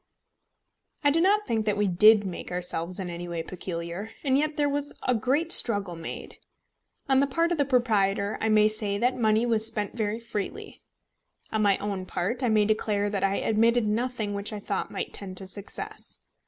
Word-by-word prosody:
I 290 Hz, -, +4 dB
do 330 Hz, +3 st, +2 dB
not 415 Hz, +3 st, +3 dB
think 220 Hz, -2 st, -1 dB
that 210 Hz, -1 st, +1 dB
we 210 Hz, -, +2 dB
did 210 Hz, +3 st, +6 dB
make 180 Hz, -1 st, -6 dB
ourselves 180 Hz, 0 st, -1 dB
in 185 Hz, -, -4 dB
any 175 Hz, 0 st, -6 dB
way 170 Hz, -1 st, -4 dB
peculiar, 175 Hz, +3 st, -6 dB
and 265 Hz, -3 st, +2 dB
yet 300 Hz, +2 st, 0 dB
there 290 Hz, -1 st, +2 dB
was 285 Hz, 0 st, -2 dB
a 250 Hz, -, +2 dB
great 275 Hz, +9 st, 0 dB
struggle 205 Hz, -, +3 dB
made. 165 Hz, 0 st, -7 dB, 0.7 s
On 265 Hz, -1 st, +4 dB
the 280 Hz, -, +3 dB
part 330 Hz, +5 st, 0 dB
of 340 Hz, -, -1 dB
the 285 Hz, -, +3 dB
proprietor, 210 Hz, -6 st, +1 dB
I 220 Hz, -, +1 dB
may 215 Hz, 0 st, +5 dB
say 215 Hz, -2 st, 0 dB
that 245 Hz, +4 st, +1 dB
money 220 Hz, -1 st, +2 dB
was 225 Hz, -2 st, +3 dB
spent 210 Hz, -2 st, -1 dB
very 215 Hz, -1 st, -2 dB
freely. 230 Hz, -4 st, -6 dB, 0.7 s
On 220 Hz, -, 0 dB
my 200 Hz, -2 st, +3 dB
own 195 Hz, -2 st, -4 dB
part, 230 Hz, +10 st, -2 dB
I 250 Hz, -, +1 dB
may 215 Hz, -1 st, +3 dB
declare 205 Hz, -1 st, 0 dB
that 200 Hz, -2 st, -2 dB
I 195 Hz, 0 st, 0 dB
omitted 230 Hz, +2 st, +3 dB
nothing 220 Hz, -1 st, -1 dB
which 200 Hz, +1 st, -3 dB
I 210 Hz, -, -5 dB
thought 200 Hz, -1 st, -3 dB
might -, -, -5 dB
tend 185 Hz, -2 st, -5 dB
to 190 Hz, -, -6 dB
success. 315 Hz, -, -6 dB
215 Hz, 195 wpm, -26 LUFS, 200-245 Hz, 0.7 s, did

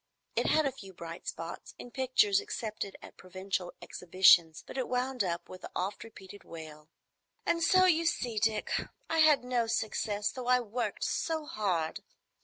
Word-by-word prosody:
It -, -, +1 dB
had 310 Hz, -1 st, +3 dB
a 275 Hz, -, +1 dB
few 195 Hz, -6 st, -12 dB
bright 170 Hz, -1 st, -9 dB
spots, 165 Hz, +1 st, -6 dB
in 245 Hz, -, -10 dB
pictures 275 Hz, -, +3 dB
accepted 220 Hz, -, -5 dB
at -, -, -12 dB
provincial 185 Hz, -1 st, -4 dB
exhibitions, 170 Hz, -2 st, +4 dB
but -, -, -10 dB
it 260 Hz, -2 st, -1 dB
wound 250 Hz, -1 st, 0 dB
up 170 Hz, -2 st, -3 dB
with 185 Hz, -, -10 dB
the -, -, -8 dB
oft 190 Hz, +3 st, -2 dB
repeated 205 Hz, -3 st, -12 dB
wail, 155 Hz, -2 st, -10 dB, 0.6 s
"And 335 Hz, -, +1 dB
so 370 Hz, +2 st, +6 dB
you 335 Hz, -2 st, +3 dB
see, 235 Hz, -8 st, 0 dB
Dick, 215 Hz, 0 st, 0 dB, 0.4 s
I 325 Hz, -, +2 dB
had 305 Hz, -4 st, +6 dB
no 245 Hz, -2 st, 0 dB
success, 215 Hz, -2 st, -1 dB
though 255 Hz, -2 st, -6 dB
I 250 Hz, 0 st, +5 dB
worked 240 Hz, +1 st, -3 dB
so 320 Hz, -2 st, -1 dB
hard." 180 Hz, -, -1 dB
215 Hz, 170 wpm, -31 LUFS, 185-260 Hz, 0.6 s, so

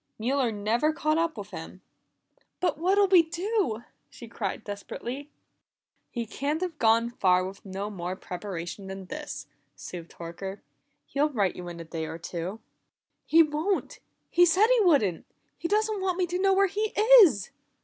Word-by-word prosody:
"Mueller 250 Hz, +2 st, +1 dB
never 220 Hz, +8 st, +1 dB
caught 310 Hz, 0 st, 0 dB
up 330 Hz, -5 st, 0 dB
with 205 Hz, 0 st, -7 dB
him." 180 Hz, +1 st, -9 dB, 0.8 s
"But 350 Hz, -5 st, 0 dB
what'll 390 Hz, +4 st, +4 dB
we 370 Hz, -2 st, +7 dB
do?" 335 Hz, -, -1 dB, 0.3 s
she 235 Hz, -, -11 dB
cried 220 Hz, -2 st, -4 dB
desperately. 240 Hz, +7 st, -6 dB, 0.8 s
"He 235 Hz, -2 st, -4 dB
can't 285 Hz, +8 st, -2 dB
have 345 Hz, -4 st, -3 dB
gone 230 Hz, +1 st, +3 dB
far 185 Hz, -5 st, +3 dB
with 195 Hz, +1 st, -8 dB
no 195 Hz, +2 st, -5 dB
more 180 Hz, -1 st, -4 dB
preparation 180 Hz, 0 st, -6 dB
than 190 Hz, 0 st, -7 dB
this," 300 Hz, +9 st, -6 dB, 0.3 s
soothed 170 Hz, -2 st, -9 dB
Horker. 185 Hz, +4 st, -7 dB, 0.4 s
"He'll 290 Hz, +2 st, +1 dB
write 205 Hz, -10 st, 0 dB
you 180 Hz, -1 st, -7 dB
in 170 Hz, -1 st, -7 dB
a -, -, -6 dB
day 160 Hz, -1 st, -5 dB
or 160 Hz, +1 st, -6 dB
two." 175 Hz, +5 st, -5 dB, 0.7 s
"He 330 Hz, +1 st, +7 dB
won't! 315 Hz, +6 st, -2 dB, 0.3 s
He 350 Hz, -, +5 dB
said 355 Hz, +5 st, +5 dB
he -, -, +5 dB
wouldn't. 275 Hz, -, +3 dB, 0.3 s
He 335 Hz, -, -3 dB
doesn't 425 Hz, +1 st, +1 dB
want 370 Hz, -2 st, 0 dB
me 370 Hz, -, +2 dB
to 355 Hz, +1 st, -2 dB
know 390 Hz, 0 st, +4 dB
where 395 Hz, +1 st, +5 dB
he 415 Hz, +3 st, -2 dB, 0.3 s
is!" 245 Hz, -, +4 dB
235 Hz, 165 wpm, -27 LUFS, -, 0.8 s, we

